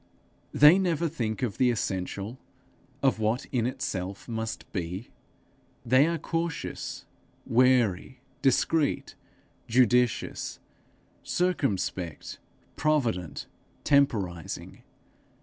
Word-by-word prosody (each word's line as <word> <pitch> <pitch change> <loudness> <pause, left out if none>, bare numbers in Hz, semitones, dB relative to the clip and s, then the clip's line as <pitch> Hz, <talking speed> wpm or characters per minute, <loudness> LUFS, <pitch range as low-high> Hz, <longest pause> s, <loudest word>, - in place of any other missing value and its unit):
They 150 +6 +7
never 170 -3 +1
think 115 -8 -3
of 110 -6 -2
the 125 - +4
essential, 100 +1 -3 0.6
of 135 -4 +3
what 110 +5 0
in 120 -2 +1
itself 95 -6 -4
must 110 -1 -4
be. 90 +3 -4 0.7
They 130 +5 +5
are 170 0 0
cautious, 165 +1 -4 0.4
wary, 125 -2 +2 0.2
discreet, 145 +3 +1 0.5
judicious, 125 0 +2 0.6
circumspect, 100 - -2 0.4
provident, 120 - 0 0.4
temporizing. 100 - 0
125 Hz, 80 wpm, -28 LUFS, 100-140 Hz, 0.7 s, They